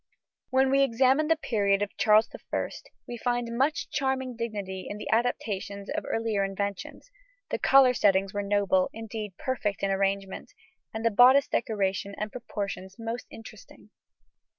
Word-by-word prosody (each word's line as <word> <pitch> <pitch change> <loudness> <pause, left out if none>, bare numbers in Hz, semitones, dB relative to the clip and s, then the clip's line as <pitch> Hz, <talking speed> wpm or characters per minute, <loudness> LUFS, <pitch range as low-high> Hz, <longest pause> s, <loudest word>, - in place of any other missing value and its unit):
When 265 +1 +3
we 275 0 +4
examine 270 +4 +3
the 325 - +4
period 205 -9 +1
of 205 - -6
Charles 215 +1 +4
I, - - -4 0.4
we 240 - -6
find 240 -1 -2
much 275 +5 0
charming 265 -2 -1
dignity 205 -5 -5
in 205 - -5
the - - -7
adaptations 205 -3 -1
of 315 +1 -3
earlier 225 -3 0
inventions; 200 - -5 0.4
the - - -1
collar 270 -2 +6
settings 195 -3 +2
were 205 - -1
noble, 200 -2 +1
indeed 220 -3 -6
perfect, 215 -7 -2
in 195 - +1
arrangement, 195 0 -2 0.4
and 220 +1 -5
the 230 - +4
bodice 255 +6 +6
decoration 200 -2 -1
and 210 0 -4
proportions 200 -5 -6
most 230 +2 -5
interesting. 225 - -14
220 Hz, 150 wpm, -27 LUFS, 200-250 Hz, 0.4 s, collar